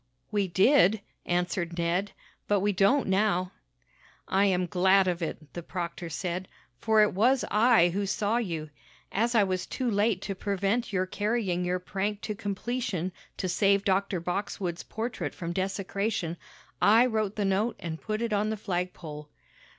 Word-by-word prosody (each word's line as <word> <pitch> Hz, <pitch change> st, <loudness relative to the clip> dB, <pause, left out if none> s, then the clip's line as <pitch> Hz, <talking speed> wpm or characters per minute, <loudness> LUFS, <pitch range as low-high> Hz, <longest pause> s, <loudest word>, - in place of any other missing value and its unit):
"We 205 Hz, -2 st, +1 dB
did," 205 Hz, +3 st, +4 dB, 0.3 s
answered 175 Hz, -1 st, -1 dB
Ned, 175 Hz, +4 st, 0 dB, 0.3 s
"but 205 Hz, -2 st, +2 dB
we 205 Hz, +1 st, +1 dB
don't 200 Hz, +9 st, +3 dB
now." 190 Hz, -2 st, +1 dB, 0.8 s
"I 195 Hz, +1 st, +3 dB
am 185 Hz, -2 st, +2 dB
glad 190 Hz, +2 st, +4 dB
of 175 Hz, -1 st, -1 dB
it," 155 Hz, -2 st, -5 dB
the 175 Hz, -, -5 dB
proctor 170 Hz, 0 st, -5 dB
said, 180 Hz, +3 st, -3 dB, 0.3 s
"for 220 Hz, -, +4 dB
it 210 Hz, -, +1 dB
was 245 Hz, +7 st, +3 dB
I 215 Hz, -5 st, +5 dB
who 200 Hz, +3 st, -2 dB
saw 210 Hz, +3 st, 0 dB
you. 165 Hz, -9 st, -3 dB, 0.4 s
As 235 Hz, +4 st, +1 dB
I 215 Hz, -, +6 dB
was 185 Hz, -1 st, -2 dB
too 255 Hz, -3 st, -2 dB
late 205 Hz, -1 st, +2 dB
to 200 Hz, -, -3 dB
prevent 200 Hz, +4 st, -1 dB
your 185 Hz, -2 st, +1 dB
carrying 205 Hz, -2 st, -1 dB
your 180 Hz, +1 st, 0 dB
prank 200 Hz, +3 st, -3 dB
to 220 Hz, -1 st, -3 dB
completion 205 Hz, -2 st, -3 dB, 0.3 s
to 185 Hz, -, -2 dB
save 200 Hz, +2 st, +2 dB
Dr. 195 Hz, -1 st, +1 dB
Boxwood's 180 Hz, 0 st, -3 dB
portrait 225 Hz, +2 st, -4 dB
from 170 Hz, -2 st, -4 dB
desecration, 195 Hz, -1 st, -2 dB, 0.5 s
I 225 Hz, +4 st, +6 dB
wrote 215 Hz, -4 st, -1 dB
the 205 Hz, -, 0 dB
note 200 Hz, +5 st, +1 dB
and 160 Hz, -1 st, -5 dB
put 215 Hz, +1 st, -2 dB
it 230 Hz, -2 st, -1 dB
on 210 Hz, +1 st, +1 dB
the 220 Hz, -, -2 dB
flagpole." 175 Hz, -6 st, -4 dB
195 Hz, 160 wpm, -28 LUFS, 180-215 Hz, 0.8 s, I